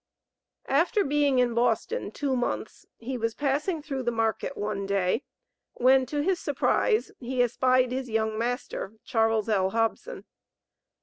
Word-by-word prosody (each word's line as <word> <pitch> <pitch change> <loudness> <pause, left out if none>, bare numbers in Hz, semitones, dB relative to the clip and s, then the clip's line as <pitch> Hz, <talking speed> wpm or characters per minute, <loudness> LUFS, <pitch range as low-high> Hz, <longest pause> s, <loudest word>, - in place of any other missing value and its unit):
After 345 - +2
being 285 -1 +2
in 245 -1 +3
Boston 240 - 0
two 275 -2 -2
months, 245 -1 -3
he 250 +2 -5
was 230 0 -1
passing 295 +4 -1
through 275 -3 -3
the 240 - 0
market 225 +4 -1
one 205 -1 -3
day, 195 +2 +1 0.5
when, 260 +1 +4
to 290 +2 -1
his 370 +1 +1
surprise, 425 - +1
he 250 0 0
espied 255 +1 +2
his 255 0 -3
young 220 -1 0
master, 235 -3 -3
Charles 225 -1 +1
L. 195 -4 +2
Hobson. 225 - -2
250 Hz, 140 wpm, -27 LUFS, 225-280 Hz, 0.5 s, when